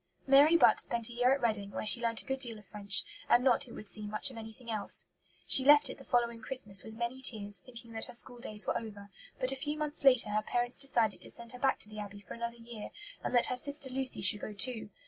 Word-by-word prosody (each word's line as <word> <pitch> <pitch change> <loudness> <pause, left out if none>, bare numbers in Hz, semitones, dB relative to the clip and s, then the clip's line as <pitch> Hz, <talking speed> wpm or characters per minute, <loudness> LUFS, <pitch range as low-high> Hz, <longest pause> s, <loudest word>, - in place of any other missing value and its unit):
'" - - -45
Mary 285 +5 +5
Butt - - +4
spent 235 -1 0
a - - -11
year 245 +2 +1
at 275 -1 -1
Reading, 210 -4 -2
where 200 - -7
she 235 +3 +7
learnt 230 -1 -1
a - - -27
good 265 0 -4
deal 235 -4 -5
of 210 - -17
French, 200 0 +4 0.3
and 245 - +3
not, 260 +1 +1
it 235 - -13
would 215 - -11
seem, 210 0 +1
much 215 +5 -2
of 245 - -13
anything 225 +2 -10
else. 210 -2 +4 0.4
She 265 - +3
left 290 +2 +4
it - - -13
the - - -13
following 235 -3 -2
Christmas 220 -5 -1
with 220 - -12
many 240 +3 -5
tears, 205 -6 +3
thinking 235 -2 -14
that 225 0 -5
her - - -9
school 240 0 -1
days 215 -4 -1
were - - -2
over; 205 -3 -8 0.3
but 255 +1 +1
a - - -4
few 295 +3 -6
months 300 -1 -2
later 250 -6 +4
her 210 +1 -1
parents 240 +3 -3
decided 235 -6 +1
to - - -7
send 235 0 -7
her 250 - -12
back 270 0 0
to - - -7
the 215 0 -11
Abbey 205 -1 -9
for 200 - -12
another 235 0 -7
year, 230 -2 -11 0.3
and - - -4
that 240 - +3
her 255 - -3
sister 280 0 +1
Lucy 265 0 +1
should 200 +2 +4
go 215 - -7
too. 225 +2 -1
235 Hz, 265 wpm, -30 LUFS, 215-260 Hz, 0.4 s, she